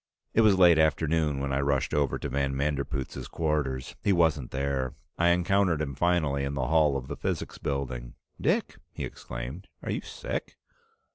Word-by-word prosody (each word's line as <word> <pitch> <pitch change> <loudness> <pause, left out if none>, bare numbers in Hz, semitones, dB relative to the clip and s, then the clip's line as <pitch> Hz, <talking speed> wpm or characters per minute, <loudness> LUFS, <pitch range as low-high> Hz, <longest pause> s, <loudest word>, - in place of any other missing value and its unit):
It 115 - +5
was 105 -3 +5
late 85 -3 +7
afternoon 80 -1 +2
when 70 0 -2
I 70 - +1
rushed 70 -1 +1
over 70 -2 +1
to - - -4
van 70 0 -1
Manderpootz's 70 -1 -2
quarters. 75 -5 -1
He 100 - +2
wasn't 80 -7 +2
there; 65 -1 -1 0.2
I 85 - +4
encountered 90 -1 +3
him 75 -3 -2
finally 75 -2 +1
in 70 +1 -2
the 65 -2 -1
hall 75 -3 +4
of 65 -1 -6
the - - -4
Physics - - -3
Building. 65 -4 -3 0.3
"Dick!" - - +1 0.2
he - - -4
exclaimed. 70 +11 -7 0.2
"Are - - -2
you - - -1
sick?" - - -5
70 Hz, 170 wpm, -28 LUFS, 70-80 Hz, 0.3 s, late